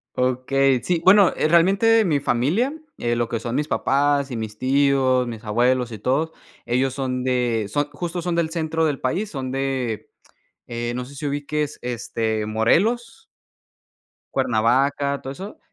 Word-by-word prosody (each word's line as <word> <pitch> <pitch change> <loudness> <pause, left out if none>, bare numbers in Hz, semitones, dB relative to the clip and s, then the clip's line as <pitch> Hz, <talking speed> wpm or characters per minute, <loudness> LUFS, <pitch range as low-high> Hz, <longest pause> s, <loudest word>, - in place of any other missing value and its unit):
Okey, 130 0 +1
sí, 170 +4 0
bueno, 195 -1 +6
eh, - - +1
realmente 195 +7 +4
mi 150 -5 +2
familia, 145 - +1 0.3
eh, 120 0 0
lo 120 0 0
que 115 - -3
son 120 +2 -4
mis 150 +2 0
papás 140 -1 +1
y 120 - -4
mis 110 -1 -6
tíos, 135 -1 +2
mis 115 -2 -7
abuelos 120 +3 +1
y 110 - -6
todo, 135 +9 0 0.3
ellos 130 +2 +1
son 130 -2 -2
de 125 -4 0
son, 145 +8 -1
justo, 175 +4 -4
son 175 0 -2
del 165 -1 0
centro 160 -1 0
del 145 -3 -1
país, 195 +11 -2
son 135 -3 -4
de, 130 -4 -2 0.6
eh, 120 0 -3
no 125 - -4
sé 140 +3 -13
si 150 - -6
ubiques, 145 +1 -3
este, 115 -2 -2
Morelos. 215 - +1 1.1
Cuernavaca, 135 +4 +1
todo 135 - -6
eso. 195 +8 -9
135 Hz, 160 wpm, -22 LUFS, 120-155 Hz, 1.1 s, bueno